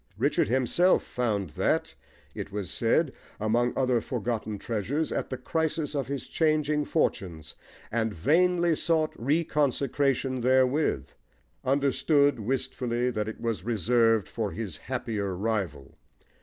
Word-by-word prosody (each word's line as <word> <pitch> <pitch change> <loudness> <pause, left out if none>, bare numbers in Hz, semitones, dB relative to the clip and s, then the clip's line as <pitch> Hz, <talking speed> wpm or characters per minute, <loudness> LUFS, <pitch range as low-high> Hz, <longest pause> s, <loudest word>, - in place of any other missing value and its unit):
Richard 135 +1 +2
himself 130 - +3
found 105 -8 -2
that, - - 0 0.4
it - - -6
was 100 -2 -4
said, 130 +5 +2 0.3
among 120 +3 +2
other 125 -3 +2
forgotten 110 -3 -3
treasures, 120 +9 -2
at - - -2
the 130 - -3
crisis 160 +3 -1
of 140 -4 -2
his 140 0 -4
changing 150 -2 +1
fortunes, 85 - -1 0.4
and 115 -1 0
vainly 170 - +3
sought 160 -1 +1
reconsecration 140 -2 0
therewith 130 +4 +2 0.5
understood, 140 +1 +2
wistfully, 125 +1 -1
that 105 -2 -2
it 110 - -8
was 115 -5 -2
reserved 115 0 +2
for 110 -3 -3
his 105 -6 -5
happier 110 -7 -3
rival. 90 -9 -3
125 Hz, 120 wpm, -28 LUFS, 110-145 Hz, 0.5 s, himself